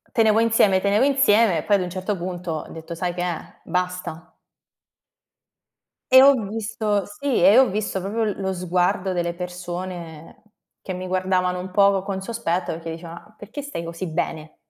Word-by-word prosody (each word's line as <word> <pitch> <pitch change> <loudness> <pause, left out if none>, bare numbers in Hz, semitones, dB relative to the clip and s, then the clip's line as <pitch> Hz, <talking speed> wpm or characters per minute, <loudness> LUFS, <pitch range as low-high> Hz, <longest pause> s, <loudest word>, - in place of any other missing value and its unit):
Tenevo 220 -1 +4
insieme, 225 -4 +4
tenevo 200 +4 +2
insieme, 230 - +4
poi 205 - +4
ad 195 - +1
un 180 - -3
certo 185 +3 -3
punto 180 -1 -5
ho 155 - -5
detto: 165 +1 -8
"Sai 175 +1 -2
che 175 - -4
è, 175 -3 -5
basta." 180 -2 -4 1.8
E 260 - +10
ho 280 +1 +8
visto 210 -1 -1
sì, 260 +6 -3
e 195 +6 +7
ho 265 0 +7
visto 200 -1 -2
proprio 205 +5 -2
l 205 -2 -3
lo 190 -1 -1
sguardo 180 +1 0
delle 170 -1 -1
persone 175 -2 -7 0.4
che 185 - -5
mi 185 +1 -5
guardavano 185 -1 0
un 185 +1 -7
poco 195 0 +4
con 195 -1 -4
sospetto, 190 -6 -2
perché 165 0 -6
dicevano: 165 +1 -8
"Ma 215 - -24
perché 220 +8 -7
stai 285 -12 -5
così 170 +2 -5
bene?" 160 -1 -4
185 Hz, 170 wpm, -23 LUFS, 175-205 Hz, 1.8 s, E